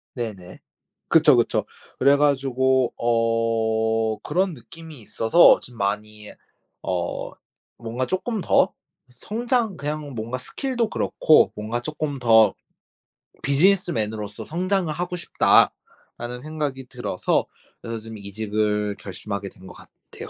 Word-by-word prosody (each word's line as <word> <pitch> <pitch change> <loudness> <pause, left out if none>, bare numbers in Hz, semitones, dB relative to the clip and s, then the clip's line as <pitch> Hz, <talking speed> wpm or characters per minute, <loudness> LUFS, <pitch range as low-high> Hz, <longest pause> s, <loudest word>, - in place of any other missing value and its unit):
네네. 100 -7 -6 0.5
그쵸, 155 -3 +6
그쵸. 120 - +1 0.3
그래 140 +1 +5
가지고 130 -3 +2
어 115 -1 +1
그런 180 +3 0
느낌이 155 +5 -12
있어서 110 +9 +5
좀 120 -1 -12
많이 105 +1 -3 0.5
어 90 -2 -3 0.5
뭔가 120 +2 -3
쪼끔 205 - -2
더 - - +3 0.4
성장 225 - -2
그냥 145 0 -4
뭔가 115 +3 -4
스킬도 240 - -2
그렇고 155 - +3
뭔가 110 +3 -3
'쪼끔 150 -1 -4
더 110 -3 +5 0.9
비즈니스맨으로서 135 - +1
성장을 180 +1 -1
하고 180 +2 -3
싶다.'라는 125 -7 0
생각이 145 -3 -4
들어서 125 -8 -1 0.4
그래서 115 0 -5
지금 110 0 -9
이직을 105 0 -2
결심하게 100 +1 -6
된 95 0 -16
것 - - -11
같아요. - - -13
120 Hz, 255 characters per minute, -23 LUFS, 110-155 Hz, 0.9 s, 그쵸